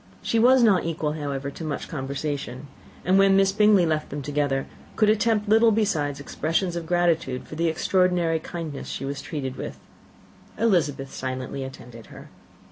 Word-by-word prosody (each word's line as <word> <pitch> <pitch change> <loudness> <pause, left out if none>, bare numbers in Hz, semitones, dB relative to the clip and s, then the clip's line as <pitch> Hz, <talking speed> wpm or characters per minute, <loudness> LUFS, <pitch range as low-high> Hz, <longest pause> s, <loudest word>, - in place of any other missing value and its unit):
She 230 - +1
was 250 +2 +6
not 200 -6 +4
equal, 160 -2 -2
however, 140 -2 -4
to 165 - -9
much 155 -3 -4
conversation; 140 -2 -4 0.4
and 185 +3 +4
when 195 0 +5
Miss 195 0 +4
Bingley 210 -2 +4
left 155 -1 -1
them 145 0 -5
together, 145 -1 -1 0.3
could 215 -1 +4
attempt 220 -1 +1
little 225 +2 +5
beside 160 -10 0
expressions 165 +5 -1
of 170 -1 -5
gratitude 165 -7 0
for - - -10
the 165 +2 0
extraordinary 175 0 +1
kindness 160 -3 -6
she - - -5
was 140 0 -4
treated 135 -4 -5
with. - - -6 0.8
Elizabeth 150 -11 +1
silently 130 +1 -4
attended 120 -3 -10
her. - - -13
160 Hz, 160 wpm, -25 LUFS, 140-195 Hz, 0.8 s, was